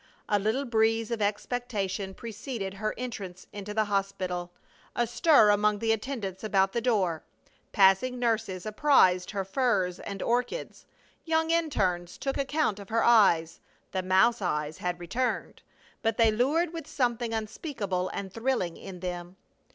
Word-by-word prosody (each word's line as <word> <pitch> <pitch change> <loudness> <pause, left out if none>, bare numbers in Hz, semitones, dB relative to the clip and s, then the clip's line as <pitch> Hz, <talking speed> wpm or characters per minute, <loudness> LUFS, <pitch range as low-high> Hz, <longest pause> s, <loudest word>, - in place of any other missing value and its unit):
A 205 - +2
little 220 +8 0
breeze 225 -1 +1
of 230 -2 -2
expectation 205 -3 -2
preceded 220 -2 -5
her 215 +2 -3
entrance 200 -7 -6
into 205 0 -6
the 215 +1 +2
hospital, 190 -3 -2 0.4
a 240 - +2
stir 240 -2 +5
among 210 0 +2
the 225 +2 0
attendants 220 -4 -3
about 195 -3 +2
the 235 - -1
door. 195 -9 +1 0.5
Passing 195 +6 +4
nurses 225 -6 -1
apprized 210 -6 +4
her 195 -2 -3
furs 195 -5 0
and 200 -1 -6
orchids; 245 - -2 0.4
young 320 0 +1
interns 190 - 0
took 270 -1 -2
account 275 -6 0
of 200 - -10
her 230 0 +2
eyes 170 -8 +4 0.3
the 190 - -1
mouse 190 +6 +3
eyes 150 -4 -2
had 180 0 -2
returned, 240 +9 -2 0.4
but 225 -1 0
they 225 -2 +5
lured 300 +10 +1
with 330 -1 -6
something 240 -3 -1
unspeakable 215 - -3
and 195 -1 -6
thrilling 230 -8 -1
in 185 -2 -9
them. 175 0 -5
210 Hz, 145 wpm, -28 LUFS, 190-240 Hz, 0.5 s, stir